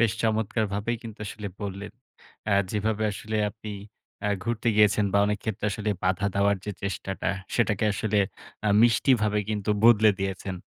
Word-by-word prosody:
বেশ, 115 Hz, -2 st, +3 dB
চমৎকারভাবেই 110 Hz, 0 st, 0 dB
কিন্তু 115 Hz, -2 st, -9 dB
আসলে 105 Hz, 0 st, -6 dB
বললেন, 100 Hz, 0 st, -5 dB, 0.6 s
আ -, -, +3 dB, 0.2 s
যেভাবে 110 Hz, +1 st, -1 dB
আসলে 110 Hz, +2 st, -4 dB
আপনি 110 Hz, 0 st, -9 dB, 0.6 s
আ -, -, +2 dB, 0.2 s
ঘুরতে 115 Hz, 0 st, -1 dB
গিয়েছেন 105 Hz, 0 st, +4 dB
বা, 100 Hz, -, +4 dB
অনেক 105 Hz, 0 st, 0 dB
ক্ষেত্রে 105 Hz, -1 st, -2 dB
আসলে 105 Hz, +1 st, -2 dB
বাধা 95 Hz, +2 st, +1 dB
দেওয়ার 100 Hz, 0 st, +3 dB
যে 105 Hz, -, -3 dB
চেষ্টাটা, 95 Hz, 0 st, -3 dB, 0.3 s
সেটাকে 110 Hz, -3 st, +1 dB
আসলে 105 Hz, +1 st, 0 dB, 0.5 s
আ -, -, +3 dB
মিষ্টিভাবে 115 Hz, -3 st, +3 dB
কিন্তু 105 Hz, -1 st, -1 dB
বদলে 110 Hz, -2 st, +7 dB
দিয়েছেন। 95 Hz, 0 st, -3 dB
105 Hz, 150 wpm, -26 LUFS, 100-110 Hz, 0.6 s, বদলে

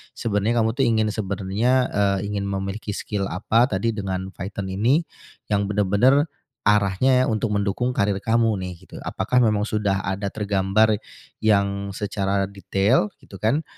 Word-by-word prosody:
sebenarnya 110 Hz, +2 st, 0 dB
kamu, 110 Hz, -, +2 dB
tuh, 135 Hz, -, +3 dB
ingin 110 Hz, -2 st, +2 dB
sebenarnya, 100 Hz, +3 st, -1 dB, 0.2 s
eee, 100 Hz, 0 st, 0 dB
ingin 100 Hz, -1 st, -2 dB
memiliki 100 Hz, +2 st, -4 dB
skill 100 Hz, -2 st, -3 dB
apa 115 Hz, +8 st, +2 dB
tadi 105 Hz, +4 st, 0 dB
dengan 95 Hz, -2 st, -3 dB
Python 95 Hz, 0 st, -5 dB
ini, 120 Hz, -, +2 dB, 0.5 s
yang 100 Hz, -1 st, +2 dB
benar-benar 105 Hz, -, +3 dB, 0.4 s
arahnya 105 Hz, +6 st, +3 dB
untuk 110 Hz, -1 st, -1 dB
mendukung 100 Hz, +5 st, 0 dB
karir 100 Hz, -1 st, +1 dB
kamu, 115 Hz, -1 st, +2 dB
nih, 90 Hz, -1 st, -5 dB
gitu. -, -, -13 dB
Apakah 125 Hz, +6 st, +1 dB
memang 105 Hz, -2 st, +2 dB
sudah 105 Hz, -2 st, 0 dB
ada 100 Hz, +2 st, -2 dB
tergambar 105 Hz, +1 st, +2 dB, 0.5 s
yang 100 Hz, -2 st, +2 dB
secara 100 Hz, -1 st, -1 dB
detail, 100 Hz, +3 st, +1 dB
gitu, 95 Hz, -, -12 dB
kan? 135 Hz, +9 st, +1 dB
105 Hz, 145 wpm, -23 LUFS, 100-110 Hz, 0.5 s, tuh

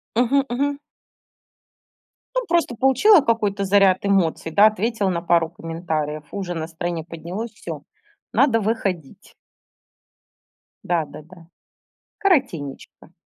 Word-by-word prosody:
Мгм 260 Hz, +3 st, +3 dB
мгм. 280 Hz, +3 st, -1 dB, 1.6 s
Ну, -, -, +2 dB
просто 335 Hz, -8 st, +1 dB
получила 270 Hz, -, +5 dB
какой-то 210 Hz, -5 st, 0 dB
заряд 195 Hz, -1 st, +4 dB
эмоций, 180 Hz, -5 st, +1 dB
да, 205 Hz, +5 st, +6 dB
ответила 215 Hz, -1 st, 0 dB
на 170 Hz, -2 st, -1 dB
пару 170 Hz, -1 st, +2 dB
комментариев. 160 Hz, -3 st, -4 dB
Уже 190 Hz, -3 st, -4 dB
настроение 165 Hz, 0 st, -4 dB
поднялось. 175 Hz, +7 st, -6 dB
Всё, 165 Hz, -8 st, -8 dB, 0.5 s
надо 235 Hz, -1 st, +3 dB
выходить. 195 Hz, -, -3 dB, 1.5 s
Да-да-да. 165 Hz, 0 st, -4 dB, 0.7 s
Коротенечко. 255 Hz, -, -1 dB
190 Hz, 95 wpm, -22 LUFS, 165-230 Hz, 1.6 s, да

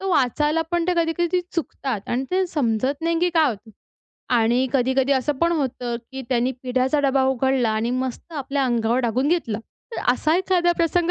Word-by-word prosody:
तर 390 Hz, -, -5 dB
वाचायला 300 Hz, 0 st, +2 dB
पण 345 Hz, -1 st, +1 dB
ते 360 Hz, -, +4 dB
कधी-कधी 345 Hz, +2 st, 0 dB
चुकतात 265 Hz, -, -3 dB
आणि 255 Hz, +3 st, -1 dB
ते 375 Hz, +1 st, +2 dB
समजत 270 Hz, -2 st, -1 dB
नाही 330 Hz, 0 st, +1 dB
की 355 Hz, -, +3 dB
काय 320 Hz, -3 st, +3 dB
होतं. 220 Hz, 0 st, -9 dB, 0.6 s
आणि 240 Hz, +3 st, +3 dB
कधी-कधी 265 Hz, +1 st, +2 dB
असं 265 Hz, +2 st, +1 dB
पण 335 Hz, +3 st, +2 dB
होतं, 255 Hz, -6 st, -2 dB, 0.2 s
की 265 Hz, -, -5 dB
त्यानी 250 Hz, 0 st, +1 dB
पिठाचा 255 Hz, +3 st, +1 dB
डबा 270 Hz, 0 st, +2 dB
उघडला 265 Hz, -2 st, +1 dB
आणि 220 Hz, +2 st, -1 dB
मस्त 255 Hz, +5 st, -4 dB
आपल्या 280 Hz, -2 st, -1 dB
अंगावर 235 Hz, 0 st, +1 dB
टाकून 250 Hz, +3 st, 0 dB
घेतला. 305 Hz, -11 st, 0 dB, 0.3 s
तर -, -, -4 dB
असा 310 Hz, +6 st, +1 dB
एखादा 360 Hz, -2 st, +2 dB
प्रसंग 340 Hz, +1 st, +1 dB
265 Hz, 180 wpm, -22 LUFS, 245-330 Hz, 0.6 s, ते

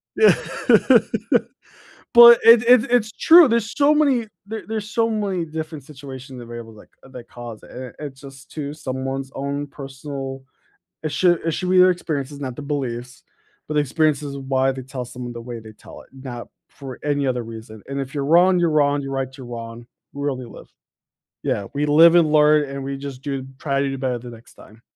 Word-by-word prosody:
Yeah. 435 Hz, -, +6 dB, 1.8 s
But 235 Hz, 0 st, +10 dB
it 230 Hz, 0 st, +8 dB
it 240 Hz, -1 st, +5 dB
it's 220 Hz, -3 st, +2 dB
true, 330 Hz, -3 st, +7 dB
there's 230 Hz, -3 st, -1 dB
so 290 Hz, +1 st, +4 dB
many 275 Hz, -6 st, +2 dB, 0.2 s
there 220 Hz, +1 st, -6 dB
there's 215 Hz, -1 st, -5 dB
so 230 Hz, 0 st, +1 dB
many 200 Hz, -5 st, -2 dB
different 155 Hz, -2 st, -7 dB
situations 135 Hz, -2 st, -10 dB
and 120 Hz, -, -11 dB
variables, 115 Hz, -2 st, -9 dB
like, 105 Hz, -, -16 dB
that 125 Hz, -3 st, -12 dB
cause 120 Hz, -3 st, -10 dB
it, -, -, -15 dB
and 125 Hz, -1 st, -9 dB
it's 140 Hz, -3 st, -8 dB
just 135 Hz, 0 st, -13 dB
to 145 Hz, -2 st, -5 dB
someone's 135 Hz, -1 st, -5 dB
own 140 Hz, +1 st, -3 dB
personal 135 Hz, -1 st, -8 dB, 0.6 s
it 155 Hz, -, -2 dB
should 175 Hz, +1 st, +2 dB
it 165 Hz, -, +1 dB
should 180 Hz, +3 st, -3 dB
be 185 Hz, -, +3 dB
their 185 Hz, 0 st, +7 dB
experiences, 145 Hz, -5 st, -4 dB
not 130 Hz, -3 st, -5 dB
the -, -, -7 dB
beliefs, 130 Hz, -4 st, -5 dB, 0.4 s
but 155 Hz, -, -4 dB
the 150 Hz, -, +4 dB
experiences 145 Hz, 0 st, 0 dB
of 135 Hz, -1 st, -8 dB
why 135 Hz, 0 st, +1 dB
they 130 Hz, 0 st, -7 dB
tell 130 Hz, 0 st, -6 dB
someone 125 Hz, 0 st, -8 dB
the 120 Hz, -, -8 dB
way 120 Hz, -1 st, -7 dB
they 110 Hz, -1 st, -13 dB
tell -, -, -14 dB
it, -, -, -21 dB
not 130 Hz, -3 st, -8 dB, 0.2 s
for 135 Hz, -3 st, -10 dB
any 145 Hz, -1 st, 0 dB
other 125 Hz, -2 st, -1 dB
reason. 110 Hz, -1 st, -10 dB
And 140 Hz, 0 st, -4 dB
if 135 Hz, +3 st, -8 dB
you're 140 Hz, -, -2 dB
wrong, 180 Hz, +4 st, +5 dB
you're 170 Hz, -, +2 dB
wrong, 145 Hz, -1 st, +2 dB
you're 135 Hz, -, -6 dB
right, 135 Hz, -1 st, -2 dB
you're 130 Hz, -, -10 dB
wrong, 115 Hz, 0 st, -8 dB, 0.3 s
we 140 Hz, +1 st, -2 dB
only 130 Hz, -2 st, -5 dB
live. -, -, -13 dB, 0.7 s
Yeah, 100 Hz, -, -2 dB
we 145 Hz, +1 st, 0 dB
live 165 Hz, +3 st, +7 dB
and 160 Hz, -3 st, +4 dB
learn 150 Hz, -1 st, +4 dB
and 135 Hz, 0 st, -6 dB
we 135 Hz, 0 st, -4 dB
just 135 Hz, -2 st, -8 dB
do 135 Hz, -2 st, -4 dB
try 140 Hz, -2 st, -1 dB
to 140 Hz, -, 0 dB
do 135 Hz, -, -4 dB
better 130 Hz, -2 st, -2 dB
the 120 Hz, +1 st, -10 dB
next 115 Hz, 0 st, -15 dB
time. 110 Hz, +1 st, -17 dB
140 Hz, 205 wpm, -21 LUFS, 130-160 Hz, 1.8 s, But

